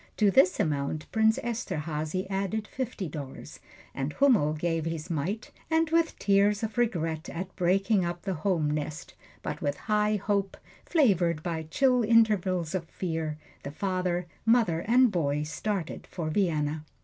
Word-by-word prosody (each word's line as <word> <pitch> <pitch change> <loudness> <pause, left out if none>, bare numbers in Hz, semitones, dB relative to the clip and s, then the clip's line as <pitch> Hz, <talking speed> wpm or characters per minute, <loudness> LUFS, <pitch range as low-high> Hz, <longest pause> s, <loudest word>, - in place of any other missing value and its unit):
To 210 -2 +4
this 185 0 +4
amount 150 0 -1
Prince 220 0 +3
Esterhazy 180 -6 -3
added 200 +2 -2
fifty 250 -7 -4
dollars, 145 -3 -8 0.3
and 135 +2 -3
Hummel 230 - +4
gave 165 0 -1
his 165 +1 -4
mite, 170 +8 -3 0.2
and 320 0 +2
with 330 0 +2
tears 200 +1 +3
of 220 -1 -3
regret 165 -9 -1
at 180 +2 -6
breaking 195 +3 +2
up 175 0 -4
the 195 - -1
home 160 -3 0
nest, 150 +1 -4 0.3
but - - -4
with 145 0 -1
high 210 0 +1
hope, 200 -1 -1 0.3
flavored 180 - +2
by 160 -3 -3
chill 250 +3 +3
intervals 205 -7 +3
of 185 -3 -2
fear, 160 -3 -3 0.2
the - - -6
father, 180 +2 -1 0.2
mother 225 -8 +3
and 245 +1 +5
boy 150 -5 0
started 170 +3 -4
for 160 -3 -4
Vienna. 155 -4 0
185 Hz, 150 wpm, -28 LUFS, 155-210 Hz, 0.3 s, and